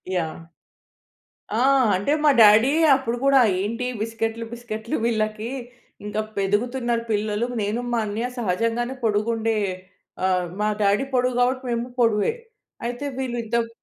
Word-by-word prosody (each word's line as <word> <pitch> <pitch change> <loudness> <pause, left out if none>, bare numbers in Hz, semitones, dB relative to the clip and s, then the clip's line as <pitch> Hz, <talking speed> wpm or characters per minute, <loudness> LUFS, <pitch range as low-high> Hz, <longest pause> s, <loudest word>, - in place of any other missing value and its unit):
Yeah! 165 -1 -3 1.1
ఆ! 225 - +1 0.4
అంటే 205 +10 0
మా 300 - +6
డాడీయె 245 +10 +6
అప్పుడు 245 -3 -2
గూడా, 275 -1 +5 0.2
"ఏంటి 230 +5 -2 0.2
బిస్కెట్‌లు, 225 0 -3
బిస్కట్‌లు 235 -1 -5
వీళ్ళకి, 215 0 -1 0.6
ఇంకా 210 +1 -2 0.2
ఎదుగుతునరు 235 +4 0
పిల్లలు." 210 +2 0
నేను, 210 +4 -1
మా 235 - +1
అన్నయ్య 215 +4 -2
సహజంగానే 230 +5 -1
పొడుగు 215 +1 +1
ఉండే 225 0 0 0.7
ఆహ్, 185 -1 +1
మా 210 - +1
డ్యాడీ 200 +4 +3
పొడువు 250 -1 +1
గాబట్టి, 255 +1 +1
మేము 235 +1 -1
పొడువే. 225 - +3 0.5
అయితే, 245 +4 -4
వీళ్ళు 250 -2 -3
ఇంతక్ 230 +1 0
230 Hz, 130 wpm, -23 LUFS, 210-240 Hz, 1.1 s, మా